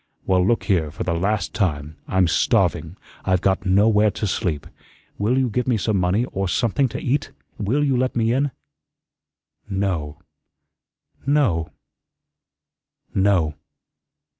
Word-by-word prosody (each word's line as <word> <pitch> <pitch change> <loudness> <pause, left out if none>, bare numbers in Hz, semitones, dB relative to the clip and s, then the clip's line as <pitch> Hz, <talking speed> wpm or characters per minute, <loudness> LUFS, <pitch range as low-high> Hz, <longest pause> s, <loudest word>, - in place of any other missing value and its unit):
"Well, 90 -1 +3
look 115 +5 +1
here, 85 -7 +1
for 80 - -5
the 85 - -1
last 100 +3 -1
time. 75 -6 -1
I'm 95 -1 +2
starving. 85 +1 +1 0.3
I've 95 -1 +2
got 95 +1 +1
nowhere 105 +2 +4
to 105 - -3
sleep. 90 -6 -2 0.5
Will 110 +6 +1
you 130 -1 +2
give 125 +2 -2
me 120 -3 +2
some 105 0 0
money, 90 +7 +1
or 95 0 -2
something 120 +8 +1
to - - -5
eat? 140 +3 -1 0.3
Will 120 +8 +1
you 135 -3 +2
let 130 +1 0
me 115 0 +2
in?" 140 +3 +1 1.2
"No 90 -7 -2 1.1
no 120 - +2 1.4
no." 95 -6 +2
100 Hz, 135 wpm, -22 LUFS, 90-115 Hz, 1.4 s, nowhere